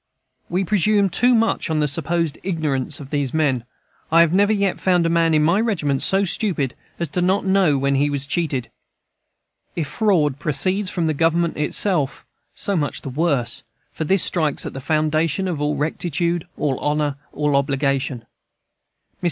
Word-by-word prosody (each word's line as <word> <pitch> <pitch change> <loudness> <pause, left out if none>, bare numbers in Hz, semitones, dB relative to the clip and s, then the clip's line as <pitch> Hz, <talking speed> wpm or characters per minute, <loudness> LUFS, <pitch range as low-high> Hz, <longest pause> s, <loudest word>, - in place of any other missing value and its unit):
We 180 +2 0
presume 205 0 +2
too 245 +5 +3
much 225 -5 +1
on 155 -1 0
the 150 - +2
supposed 165 +1 -1
ignorance 155 -5 -2
of 140 -1 -10
these 145 -2 -1
men. 135 -7 +1 0.5
I 165 +1 +6
have 170 0 +3
never 200 +3 +4
yet 200 -3 0
found 180 -2 +2
a - - +2
man 165 -1 +3
in 150 - +3
my 170 +7 +3
regiment 160 -12 0
so 195 +1 +4
stupid 170 - 0 0.2
as 170 -4 -4
not 185 +2 +1
to - - -5
know 190 -7 +3
when 140 +1 +1
he 140 +2 +2
was 140 -1 -2
cheated. 140 -5 -2 1.0
If 160 -4 -2
fraud 155 - +1
proceeds 185 +6 0
from 170 -2 -1
Government 165 +2 +1
itself, 150 -1 -1 0.3
so 200 - -1
much 145 -4 -2
the - - -5
worse, 140 -3 -1 0.3
for - - -3
this 190 +4 +2
strikes 155 -5 -1
at - - -5
the 135 - -6
foundation 155 +4 0
of 165 -5 -3
all 150 0 0
rectitude, 170 +3 -1
all 140 -4 -1
honor, 150 -1 -1
all 150 -1 0
obligation. 140 -2 0
Mr. - - -47
160 Hz, 170 wpm, -21 LUFS, 145-180 Hz, 1.0 s, I